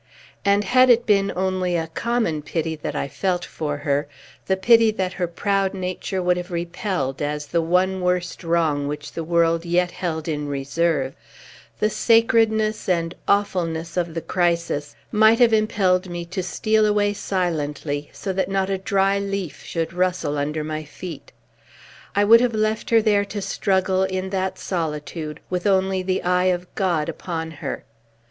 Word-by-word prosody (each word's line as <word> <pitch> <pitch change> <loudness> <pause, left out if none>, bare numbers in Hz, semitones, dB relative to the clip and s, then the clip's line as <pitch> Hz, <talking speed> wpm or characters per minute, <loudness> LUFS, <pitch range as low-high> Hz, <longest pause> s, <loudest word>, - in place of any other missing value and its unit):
And 200 +1 +3
had 255 +4 +5
it 235 -1 +5
been 200 -2 +3
only 185 -1 0
a 165 -1 0
common 170 -2 -1
pity 160 +1 -2
that 150 - -5
I - - -1
felt 180 +4 -1
for 150 -2 -4
her, 145 0 -1 0.4
the 190 - +2
pity 225 +3 +5
that 190 -3 -2
her 180 -2 -1
proud 195 +2 0
nature 185 0 -3
would 180 0 +2
have 180 +1 -5
repelled, 170 -5 -3
as 150 0 -2
the 170 +3 0
one 185 +3 +1
worst 180 0 -1
wrong 160 -4 +1
which 150 0 -5
the 165 - -4
world 165 0 +2
yet 175 +1 +1
held 160 -3 -4
in 150 -2 -2
reserve, 140 0 0 0.6
the 215 0 +1
sacredness 225 -2 +3
and 170 -1 +1
awfulness 170 -5 0
of 170 -2 -1
the 165 - -2
crisis 170 -4 -1 0.2
might 220 +1 +5
have 235 -2 +5
impelled 195 -4 +2
me 175 0 -5
to 185 +3 -4
steal 215 +4 +1
away 205 -1 +2
silently, 150 -7 -2
so 190 - -4
that 185 0 -1
not 195 0 0
a 190 - -1
dry 195 +1 +2
leaf 195 -4 -4
should 165 0 -3
rustle 180 -4 0
under 150 +2 -2
my 155 0 -4
feet. 160 +1 -9 0.8
I 205 - +4
would 230 +3 +7
have 245 -2 +1
left 215 0 0
her 215 -3 +4
to 205 +1 -5
struggle, 190 -1 +1
in 190 0 -3
that 190 -1 -1
solitude, 155 -2 -4
with 180 +2 -1
only 190 -1 +2
the 185 0 -1
eye 180 0 +2
of 180 -1 -1
God 175 -6 0
upon 160 -2 -4
her. 155 - -5
180 Hz, 165 wpm, -22 LUFS, 165-200 Hz, 0.8 s, would